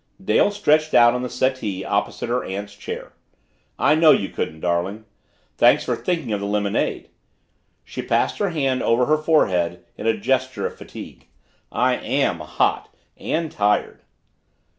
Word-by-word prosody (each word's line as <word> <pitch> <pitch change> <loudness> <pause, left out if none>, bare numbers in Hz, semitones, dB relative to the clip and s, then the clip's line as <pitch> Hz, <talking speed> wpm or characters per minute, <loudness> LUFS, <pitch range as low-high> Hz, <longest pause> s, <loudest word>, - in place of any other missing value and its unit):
Dale 190 - +3
stretched 155 -7 +2
out 120 0 +7
on 125 - -2
the 125 - -3
settee 115 -9 -1
opposite 100 +3 -1
her 125 +1 -1
aunt's 100 +2 -6
chair. 105 - -7 0.6
"I 150 - +3
know 160 0 +5
you 100 -9 +4
couldn't, 80 0 -4
darling. 90 +5 -1 0.5
Thanks - - +5
for - - 0
thinking 165 -11 -2
of 105 - -1
the 100 - -3
lemonade." 100 -1 -1 0.7
She - - -6
passed - - 0
her 205 - +1
hand 135 -6 0
over 120 +2 +2
her 155 +3 +3
forehead 90 - +1
in 110 - -4
a 110 -1 +2
gesture 130 +4 -1
of - - -4
fatigue. - - -11 0.4
"I - - +1
AM - - 0
hot - - -1 0.3
and 160 -1 -2
tired." 105 0 0
120 Hz, 155 wpm, -22 LUFS, 100-150 Hz, 0.7 s, out